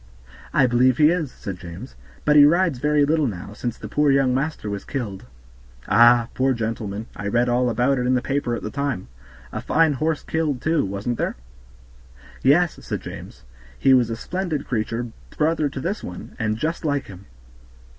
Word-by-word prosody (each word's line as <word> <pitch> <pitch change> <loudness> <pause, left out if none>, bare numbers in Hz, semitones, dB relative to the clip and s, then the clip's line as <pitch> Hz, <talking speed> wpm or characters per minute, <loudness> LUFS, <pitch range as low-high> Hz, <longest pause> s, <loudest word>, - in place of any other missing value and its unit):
"I 135 - +4
believe 125 0 +3
he 150 +1 +6
is," 165 -7 -1
said 95 -2 -7
James, 90 +9 -9 0.3
"but 150 - +4
he 145 - +9
rides 165 -2 +3
very 150 +1 +3
little 155 -1 +2
now, 100 -1 -6
since 120 +2 -4
the - - -8
poor 150 0 +2
young 135 -2 +3
master 135 -3 -2
was 100 -1 -4
killed." 105 - -5 0.6
"Ah! 120 +1 +6
poor 130 +1 +2
gentleman; 110 -2 -3
I 100 - -5
read 120 +4 +2
all 125 +1 +2
about 125 +3 +1
it 125 - -1
in 130 - +3
the 125 - +1
paper 135 -3 -1
at - - -7
the 105 - -4
time. 140 - -3 0.4
A - - -4
fine 160 -1 +3
horse 155 +3 -1
killed, 155 -5 -1
too, 160 +3 +1
wasn't 100 +5 -3
there?" - - -1 1.1
"Yes," 160 +5 +3
said - - -4
James; - - -10 0.3
"he 135 - +4
was 125 -3 +4
a 115 - -2
splendid 175 +2 -3
creature, 115 0 -2 0.3
brother 155 -1 +1
to 135 - -6
this 190 +9 -3
one, 90 - -8
and 110 -1 0
just 160 +8 -2
like 145 -3 0
him." 100 0 -12
130 Hz, 185 wpm, -23 LUFS, 115-150 Hz, 1.1 s, he